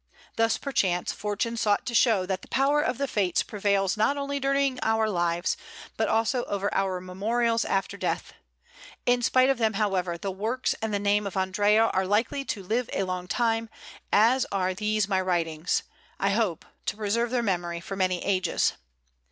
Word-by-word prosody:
Thus, 225 Hz, 0 st, +2 dB
perchance, 185 Hz, -10 st, 0 dB
Fortune 210 Hz, +3 st, -2 dB
sought 210 Hz, -3 st, +1 dB
to 245 Hz, -, -4 dB
show 220 Hz, -5 st, +4 dB
that 185 Hz, 0 st, -2 dB
the -, -, -14 dB
power 280 Hz, +2 st, +2 dB
of 250 Hz, -4 st, -1 dB
the 280 Hz, -, -1 dB
Fates 195 Hz, -7 st, +1 dB
prevails 200 Hz, -2 st, 0 dB
not 220 Hz, +7 st, +2 dB
only 280 Hz, 0 st, -2 dB
during 275 Hz, -1 st, +1 dB
our 220 Hz, 0 st, +2 dB
lives, 175 Hz, -3 st, 0 dB, 0.4 s
but -, -, 0 dB
also 225 Hz, +3 st, +1 dB
over 200 Hz, 0 st, -2 dB
our 190 Hz, -2 st, 0 dB
memorials 230 Hz, +6 st, 0 dB
after 195 Hz, 0 st, -1 dB
death. -, -, -3 dB, 0.7 s
In 245 Hz, 0 st, +3 dB
spite 255 Hz, +2 st, +4 dB
of 265 Hz, -, -2 dB
them, 220 Hz, -1 st, +2 dB
however, 190 Hz, -4 st, 0 dB
the 195 Hz, +3 st, -4 dB
works 220 Hz, +7 st, -1 dB
and 220 Hz, -1 st, -2 dB
the 205 Hz, -, +1 dB
name 205 Hz, 0 st, +1 dB
of 195 Hz, -, -5 dB
Andrea 205 Hz, +4 st, +3 dB
are 190 Hz, 0 st, +1 dB
likely 225 Hz, +7 st, +1 dB
to 200 Hz, -6 st, -4 dB
live 230 Hz, +6 st, -1 dB
a -, -, 0 dB
long 185 Hz, -1 st, -4 dB
time, 225 Hz, +1 st, 0 dB, 0.4 s
as 235 Hz, +5 st, +4 dB
are 185 Hz, -2 st, 0 dB
these 210 Hz, +1 st, 0 dB
my 190 Hz, -2 st, +1 dB
writings, 170 Hz, -2 st, 0 dB, 0.4 s
I 195 Hz, +1 st, +2 dB
hope, 200 Hz, -6 st, 0 dB, 0.2 s
to 205 Hz, -, -1 dB
preserve 220 Hz, +3 st, 0 dB
their 245 Hz, -1 st, 0 dB
memory 175 Hz, -4 st, -1 dB
for 195 Hz, +3 st, -6 dB
many 185 Hz, -2 st, 0 dB
ages. 185 Hz, -3 st, +1 dB
205 Hz, 180 wpm, -27 LUFS, 185-230 Hz, 0.7 s, show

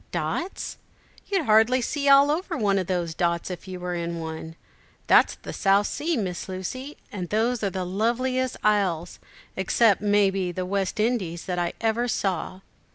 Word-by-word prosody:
"Dots? 360 Hz, +3 st, -3 dB, 0.5 s
You'd 385 Hz, -6 st, 0 dB
hardly 220 Hz, +3 st, +5 dB
see 280 Hz, +3 st, 0 dB
all 275 Hz, +1 st, +7 dB
over 335 Hz, +2 st, -2 dB
one 200 Hz, -5 st, +2 dB
of 185 Hz, -, -3 dB
those 175 Hz, -3 st, -1 dB
dots 170 Hz, +1 st, -1 dB
if 180 Hz, +1 st, -8 dB
you 185 Hz, -1 st, -6 dB
were 180 Hz, 0 st, -3 dB
in 170 Hz, -1 st, -3 dB
one. 160 Hz, 0 st, -6 dB, 0.5 s
That's -, -, +5 dB
the -, -, -9 dB
South 200 Hz, +1 st, +3 dB
Sea 320 Hz, +7 st, -1 dB
Miss 185 Hz, -4 st, -3 dB
Lucy, 255 Hz, +10 st, -5 dB
and 185 Hz, -6 st, -5 dB
those 225 Hz, +2 st, 0 dB
are 200 Hz, -, +2 dB
the 185 Hz, -1 st, -3 dB
loveliest 245 Hz, +6 st, 0 dB
isles, 190 Hz, -5 st, +1 dB, 0.4 s
except, 200 Hz, +2 st, +3 dB
may 205 Hz, -1 st, +3 dB
be, 190 Hz, -2 st, -2 dB
the 185 Hz, +1 st, -3 dB
West 195 Hz, +1 st, -2 dB
Indies, 205 Hz, -7 st, -1 dB
that 175 Hz, -2 st, -2 dB
ever 230 Hz, +1 st, +1 dB
I -, -, -2 dB
saw." 190 Hz, -4 st, -2 dB
200 Hz, 170 wpm, -25 LUFS, 180-240 Hz, 0.5 s, all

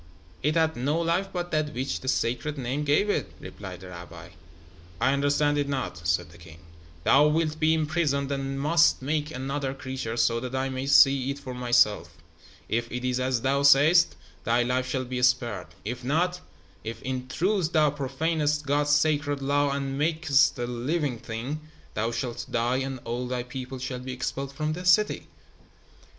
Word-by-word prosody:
"It 150 Hz, +3 st, +1 dB
had 160 Hz, -1 st, +2 dB
no 145 Hz, +7 st, 0 dB
life 170 Hz, +4 st, 0 dB
but 175 Hz, -1 st, -4 dB
that 155 Hz, -1 st, -1 dB
which 130 Hz, +2 st, -2 dB
the 130 Hz, -, -9 dB
Sacred 130 Hz, +4 st, -1 dB
Name 135 Hz, +3 st, -2 dB
gave 150 Hz, +8 st, +2 dB
it," 205 Hz, -, -1 dB
replied 95 Hz, -3 st, -9 dB
the 95 Hz, -, -10 dB
rabbi. 90 Hz, -1 st, -10 dB, 0.7 s
"I 135 Hz, -, +3 dB
understand 145 Hz, +1 st, +2 dB
it 140 Hz, -1 st, -1 dB
not," 90 Hz, -11 st, -3 dB
said 85 Hz, -4 st, 0 dB
the 85 Hz, -, -16 dB
king. 80 Hz, -2 st, -13 dB, 0.5 s
"Thou 145 Hz, -, +5 dB
wilt 155 Hz, 0 st, 0 dB
be 160 Hz, +1 st, +3 dB
imprisoned 150 Hz, -3 st, 0 dB
and 135 Hz, 0 st, -2 dB
must 165 Hz, -1 st, +3 dB
make 150 Hz, +2 st, -1 dB
another 135 Hz, 0 st, -3 dB
creature, 130 Hz, -4 st, -5 dB
so 115 Hz, 0 st, +2 dB
that 125 Hz, +2 st, -5 dB
I 135 Hz, 0 st, -1 dB
may 130 Hz, +1 st, -4 dB
see 135 Hz, -1 st, +5 dB
it 140 Hz, -, -3 dB
for 130 Hz, -3 st, -7 dB
myself. 120 Hz, -4 st, +2 dB, 0.5 s
If 115 Hz, +1 st, -2 dB
it 125 Hz, +1 st, -4 dB
is 125 Hz, 0 st, 0 dB
as 130 Hz, -2 st, 0 dB
thou 135 Hz, +2 st, +1 dB
sayest, 145 Hz, +5 st, +6 dB, 0.3 s
thy 120 Hz, +2 st, +2 dB
life 125 Hz, +1 st, -1 dB
shall 130 Hz, 0 st, -1 dB
be 125 Hz, 0 st, -3 dB
spared. 125 Hz, -6 st, +1 dB, 0.2 s
If 125 Hz, +3 st, -4 dB
not 175 Hz, +7 st, 0 dB, 0.4 s
if, 115 Hz, +1 st, -5 dB
in 130 Hz, 0 st, -3 dB
truth, 180 Hz, +4 st, 0 dB
thou 155 Hz, -3 st, +4 dB
profanest 150 Hz, +2 st, -1 dB
God's 145 Hz, +1 st, +1 dB
sacred 145 Hz, -1 st, +2 dB
law 145 Hz, +1 st, +1 dB
and 140 Hz, 0 st, -2 dB
makest 150 Hz, -3 st, +3 dB
a 120 Hz, -, -2 dB
living 125 Hz, +2 st, -2 dB
thing, 115 Hz, +7 st, -5 dB, 0.3 s
thou 110 Hz, +2 st, -1 dB
shalt 120 Hz, 0 st, -4 dB
die 120 Hz, +2 st, +1 dB
and 135 Hz, 0 st, -3 dB
all 120 Hz, +2 st, -3 dB
thy 125 Hz, -1 st, -2 dB
people 130 Hz, +1 st, -7 dB
shall 125 Hz, 0 st, -4 dB
be 130 Hz, +1 st, -6 dB
expelled 135 Hz, +2 st, -4 dB
from 155 Hz, +2 st, -2 dB
this 180 Hz, +2 st, 0 dB
city." 210 Hz, +4 st, +3 dB
135 Hz, 180 wpm, -26 LUFS, 125-150 Hz, 0.7 s, sayest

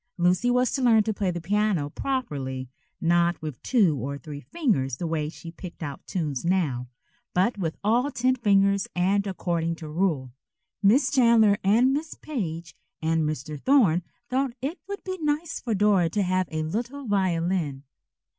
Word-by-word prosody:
Lucy 180 Hz, +6 st, +2 dB
was 250 Hz, 0 st, +2 dB
to 270 Hz, -, -1 dB
learn 225 Hz, -4 st, +5 dB
to 220 Hz, 0 st, -1 dB
play 200 Hz, -2 st, -1 dB
the 175 Hz, -1 st, -2 dB
piano 195 Hz, -3 st, +1 dB
properly, 140 Hz, -, -3 dB, 0.3 s
not 170 Hz, +1 st, +2 dB
with 155 Hz, -6 st, -7 dB
two 205 Hz, -, +3 dB
or 140 Hz, +2 st, -4 dB
three 145 Hz, -1 st, -8 dB
fingers 145 Hz, -, -1 dB
the 175 Hz, -, -4 dB
way 160 Hz, -2 st, -1 dB
she 165 Hz, +1 st, -10 dB
picked 175 Hz, 0 st, -9 dB
out 145 Hz, -3 st, -6 dB
tunes 150 Hz, -8 st, -2 dB
now, 160 Hz, -9 st, 0 dB, 0.5 s
but 195 Hz, +4 st, +2 dB
with 165 Hz, -4 st, -2 dB
all 240 Hz, +6 st, +2 dB
ten 255 Hz, -1 st, +1 dB
fingers 200 Hz, -4 st, +3 dB
and 195 Hz, +3 st, +2 dB
according 170 Hz, -3 st, -1 dB
to 160 Hz, -1 st, -9 dB
rule. 150 Hz, -6 st, -1 dB, 0.5 s
Miss 250 Hz, +7 st, +4 dB
Chandler 230 Hz, -5 st, +5 dB
and 235 Hz, +7 st, +4 dB
Miss 310 Hz, +3 st, -3 dB
Page 170 Hz, -, -5 dB, 0.2 s
and 160 Hz, 0 st, +1 dB
Mr. 150 Hz, 0 st, -5 dB
Thorne 220 Hz, -, +4 dB, 0.3 s
thought 260 Hz, 0 st, 0 dB
it 285 Hz, +8 st, -4 dB
would 400 Hz, 0 st, -6 dB
be 375 Hz, -1 st, -5 dB
nice 305 Hz, +2 st, -1 dB
for 230 Hz, -4 st, -2 dB
Dora 195 Hz, -4 st, +3 dB
to 205 Hz, +4 st, 0 dB
have 185 Hz, 0 st, +1 dB
a 155 Hz, 0 st, -2 dB
little 240 Hz, -, -4 dB
violin. 175 Hz, -, 0 dB
185 Hz, 165 wpm, -26 LUFS, 160-235 Hz, 0.5 s, learn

